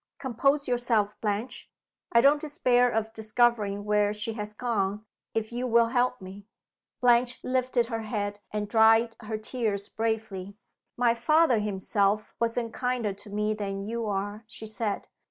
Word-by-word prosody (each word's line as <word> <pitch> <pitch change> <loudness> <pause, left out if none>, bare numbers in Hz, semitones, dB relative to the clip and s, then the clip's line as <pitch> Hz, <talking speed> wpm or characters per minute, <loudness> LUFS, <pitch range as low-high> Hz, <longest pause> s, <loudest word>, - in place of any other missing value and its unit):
Compose 275 +3 +1
yourself, 235 -4 0
Blanche. 210 +3 -3 0.4
I 235 - +6
don't 285 +3 +5
despair 250 -5 +2
of 220 -1 -2
discovering 220 -2 +1
where 210 0 +2
she 210 +2 -2
has 210 -1 -4
gone, 210 -3 -1 0.3
if 220 0 -1
you 245 +2 -2
will 230 -1 +4
help 250 0 +1
me." 195 +1 -11 0.5
Blanche 245 0 +3
lifted 255 -1 +1
her 225 -1 -3
head, 205 -2 -3
and 210 -1 -3
dried 225 +1 +4
her 220 -1 -4
tears 215 -3 -2
bravely. 215 -3 -3 0.4
"My 240 -1 +3
father 255 +1 +3
himself 205 0 0
wasn't 230 0 -1
kinder 250 -5 -1
to 205 +2 -13
me 210 +1 0
than 195 -2 -4
you 230 0 -3
are," 205 +2 -3
she 220 - -9
said. 215 -1 -3
225 Hz, 150 wpm, -27 LUFS, 210-240 Hz, 0.5 s, I